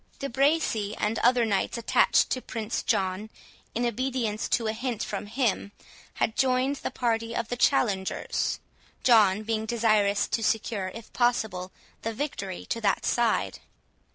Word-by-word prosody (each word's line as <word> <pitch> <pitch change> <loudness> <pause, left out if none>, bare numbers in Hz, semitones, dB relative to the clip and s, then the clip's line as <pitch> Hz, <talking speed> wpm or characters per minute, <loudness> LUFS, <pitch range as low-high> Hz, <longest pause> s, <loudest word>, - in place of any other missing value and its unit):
De 275 - -3
Bracy, 265 -6 +1
and 215 +2 0
other 245 -1 +4
knights 205 +2 0
attached 230 - +3
to 255 - 0
Prince 225 -2 -3
John, 195 -1 -1 0.5
in 240 +2 0
obedience 240 -2 -1
to 235 - +1
a 220 - 0
hint 240 -1 -3
from 205 0 -4
him, 220 -3 -1 0.4
had 220 - 0
joined 260 +2 +2
the - - -4
party 230 -1 -1
of 230 -1 -2
the 245 - -1
challengers, 210 -7 +1 0.4
John 215 -4 +5
being 220 0 -2
desirous 215 -3 +2
to 230 - 0
secure, 215 -3 -1
if 230 -1 -11
possible, 220 -7 0 0.3
the 225 0 -3
victory 200 -10 -4
to 230 - -3
that 210 - +1
side. 235 -2 +1
225 Hz, 150 wpm, -27 LUFS, 210-245 Hz, 0.5 s, John